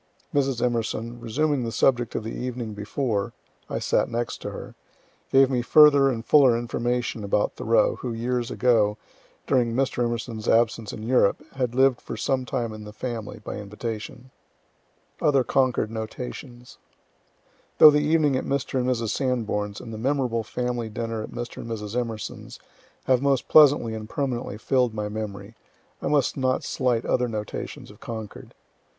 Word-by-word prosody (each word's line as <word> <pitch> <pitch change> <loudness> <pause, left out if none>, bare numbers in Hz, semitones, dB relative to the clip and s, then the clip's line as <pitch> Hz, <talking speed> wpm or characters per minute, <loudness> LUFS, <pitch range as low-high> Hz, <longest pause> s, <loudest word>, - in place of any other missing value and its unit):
Mrs. 135 -4 +1
Emerson, 115 0 -2
resuming 135 +4 0
the 115 - -3
subject 120 -1 +1
of - - -2
the 110 - -5
evening 120 -3 -4
before, 105 0 -2 0.4
(I - - -2
sat - - +1
next 120 0 -3
to - - -4
her,) - - -8 0.6
gave 135 0 +5
me 125 -2 +1
further 145 +1 +6
and 115 -3 -3
fuller 135 -6 +5
information 120 -1 -2
about 100 +1 0
Thoreau, 115 +1 +2
who, 125 - -4
years 120 +1 -2
ago, 110 -4 +2 0.5
during 120 -3 +1
Mr. 130 -2 0 0.3
E.'s 110 +1 -7
absence 115 -1 +2
in 110 - -8
Europe, 115 -4 +2
had 125 -3 -2
lived 130 -1 +3
for - - -7
some 130 -1 0
time 120 -3 -2
in 110 0 -9
the 105 - -9
family, 115 -1 -6
by - - -5
invitation. 110 +4 -7 0.9
OTHER 140 -3 +3
CONCORD 125 -3 +1
NOTATIONS 120 +2 -7 1.0
Though 155 - +10
the 150 - +3
evening 150 -2 +2
at 130 - -1
Mr. 135 -1 -1
and 125 - 0
Mrs. 115 -3 -1
Sanborn's, 110 -5 -1
and 115 - -9
the 110 - -6
memorable 125 -2 0
family 120 0 -3
dinner 115 0 -4
at - - -6
Mr. 120 0 -6
and 115 - -7
Mrs. 105 -1 -5
Emerson's, 115 -4 -5 0.4
have 130 -1 +2
most 140 -2 +1
pleasantly 145 -7 +6
and 110 -1 -7
permanently 125 -6 -3
fill'd 125 0 +1
my 105 -1 -3
memory, 105 0 -6 0.5
I - - -2
must 145 -3 +1
not 130 -1 0
slight 125 -3 0
other 125 0 +1
notations 105 -3 -6
of - - -17
Concord. 110 -3 -8
120 Hz, 160 wpm, -25 LUFS, 110-130 Hz, 1.0 s, Though